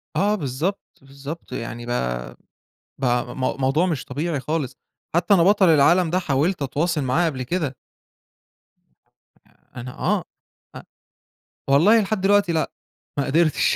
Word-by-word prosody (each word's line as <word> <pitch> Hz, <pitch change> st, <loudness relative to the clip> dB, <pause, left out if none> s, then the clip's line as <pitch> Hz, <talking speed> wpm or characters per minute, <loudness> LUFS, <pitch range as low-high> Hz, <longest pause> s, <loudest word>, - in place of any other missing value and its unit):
آه، 205 Hz, +2 st, +2 dB
بالضبط، 155 Hz, +5 st, -2 dB, 0.2 s
بالضبط 140 Hz, +3 st, -9 dB
يعني 120 Hz, -1 st, -5 dB
بقى -, -, -3 dB, 0.6 s
بقى 125 Hz, -2 st, -1 dB
م -, -, -8 dB, 0.2 s
موضوع 135 Hz, +7 st, +2 dB
مش 160 Hz, -8 st, -2 dB
طبيعي 150 Hz, +3 st, -2 dB
خالص، 150 Hz, -1 st, -3 dB, 0.4 s
حتّى 175 Hz, +4 st, +3 dB
أنا 170 Hz, -3 st, +5 dB
بطل 195 Hz, -2 st, +5 dB
العالم 160 Hz, +3 st, +4 dB
ده 180 Hz, +2 st, +1 dB
حاولت 155 Hz, +3 st, 0 dB
أتواصل 150 Hz, +4 st, 0 dB
معاه 130 Hz, +7 st, +1 dB
قبل 135 Hz, -6 st, -2 dB
كده. 150 Hz, -1 st, -2 dB, 1.7 s
آآ، -, -, -28 dB, 0.3 s
أنا 125 Hz, +1 st, -9 dB
آه، -, -, +1 dB, 0.5 s
أ -, -, -9 dB, 0.9 s
والله 200 Hz, +11 st, +5 dB
لحد 200 Hz, -1 st, -2 dB
دلوقتي 200 Hz, -2 st, +3 dB
لأ 160 Hz, -, 0 dB, 0.5 s
ما 140 Hz, -, +1 dB
قدرتش، 155 Hz, +2 st, +2 dB
155 Hz, 135 wpm, -22 LUFS, 130-175 Hz, 1.7 s, أنا